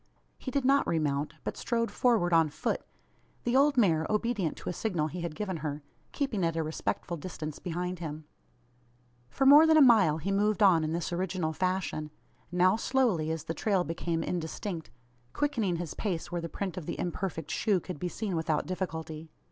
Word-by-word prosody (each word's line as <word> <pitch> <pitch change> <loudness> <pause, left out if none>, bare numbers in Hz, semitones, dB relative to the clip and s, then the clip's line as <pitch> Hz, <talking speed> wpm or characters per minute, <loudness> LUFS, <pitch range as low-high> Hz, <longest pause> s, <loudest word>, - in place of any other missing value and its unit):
He - - -5
did 270 0 -1
not 275 +1 +4
re 165 - +1
mount, 145 -1 -1
but - - -3
strode 230 -1 -1
forward 220 -9 +2
on 165 -2 +5
foot; 145 - -2 0.6
the 240 +1 0
old 280 +1 +4
mare, 165 -9 +3
obedient 210 -6 0
to - - -5
a - - -2
signal 170 -7 -1
he 175 +3 -6
had 170 -2 -4
given 190 -3 -3
her, 150 -1 -4 0.3
keeping 260 -10 -1
at 165 -1 +1
a 165 - 0
respectful 160 +2 -3
distance 155 -2 -6
behind 180 0 -3
him. 155 -2 -6 1.1
For 270 - 0
more 295 +4 +9
than 320 0 +6
a - - +8
mile 215 - +6
he 185 +5 -3
moved 210 +2 +2
on 175 -5 +6
in 155 - -1
this 170 +1 -2
original 175 -2 -1
fashion 185 -3 -1 0.4
now 180 +3 +4
slowly, 230 -11 +1
as 160 -2 -2
the 165 - -3
trail 195 0 +1
became 165 +1 -2
indistinct 170 - -4 0.4
quickening 235 -11 0
his 170 -3 -4
pace 180 -6 -3
where 175 -1 -2
the 165 - -5
print 190 0 -4
of 170 - -6
the - - -3
imperfect 170 -3 -3
shoe 205 -4 +2
could 180 -4 -7
be 180 - -2
seen 200 -1 -3
without 160 -2 0
difficulty. 160 -4 -5
180 Hz, 190 wpm, -29 LUFS, 160-210 Hz, 1.1 s, more